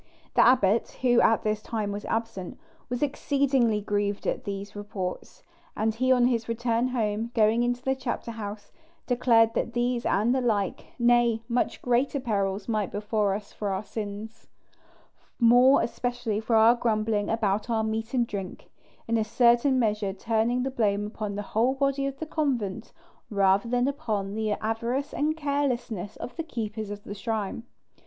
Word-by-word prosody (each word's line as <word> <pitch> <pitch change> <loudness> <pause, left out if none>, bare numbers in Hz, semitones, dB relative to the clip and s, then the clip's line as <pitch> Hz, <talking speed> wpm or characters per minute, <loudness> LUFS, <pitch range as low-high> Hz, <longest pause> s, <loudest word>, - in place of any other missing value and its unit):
The - - +5
abbot, 230 -4 +3
who 245 -2 +5
at 225 - +3
this 215 0 -1
time 215 -2 -3
was 205 +1 -5
absent, 225 -5 -3 0.3
was 245 +2 -1
exceedingly 270 -6 +1
grieved 205 -1 -1
at - - -2
these 200 +1 -5
reports; 205 -3 -6 0.3
and 220 +1 +1
he 255 +3 +1
on 250 -1 +5
his 235 -2 0
return 235 +1 0
home, 225 -2 -1
going 220 +1 +4
into 245 +1 -1
the 265 - +1
chapter 260 -2 -4
house, 205 -2 -7 0.3
declared 230 -2 +3
that 235 - -2
these 240 0 0
and 220 +5 +2
the 260 - +1
like, 210 -6 -1
nay, 240 -2 +3
much 240 0 -1
greater 255 +3 +1
perils 200 -5 -1
might 215 -4 -1
befall 210 0 0
us 200 +1 -4
for 205 - -3
our 190 +1 -2
sins, 215 +1 -7 0.9
more 245 +3 +6
especially 240 -3 -2
for 225 +1 0
our 225 +2 +7
grumbling 215 -3 0
about 215 0 0
our 225 -1 +1
meat 220 +3 -3
and 240 -2 +3
drink; 195 -4 -7 0.4
in 230 0 +1
a - - +2
certain 240 +4 +3
measure 210 -4 0
turning 230 +4 0
the 265 - -2
blame 210 -5 0
upon 210 -1 -5
the 205 - -3
whole 240 +5 +2
body 275 0 0
of 275 0 -5
the 315 - -4
convent, 245 -10 -2 0.4
rather 200 +2 +2
than 245 +1 +2
upon 215 -9 -2
the 215 -1 -1
avarice 235 +7 -2
and 310 +2 0
carelessness 255 - -2
of - - -8
the 330 - -2
keepers 220 -7 -5
of 205 0 -7
the - - -7
shrine. 215 0 -3
225 Hz, 165 wpm, -27 LUFS, 210-245 Hz, 0.9 s, our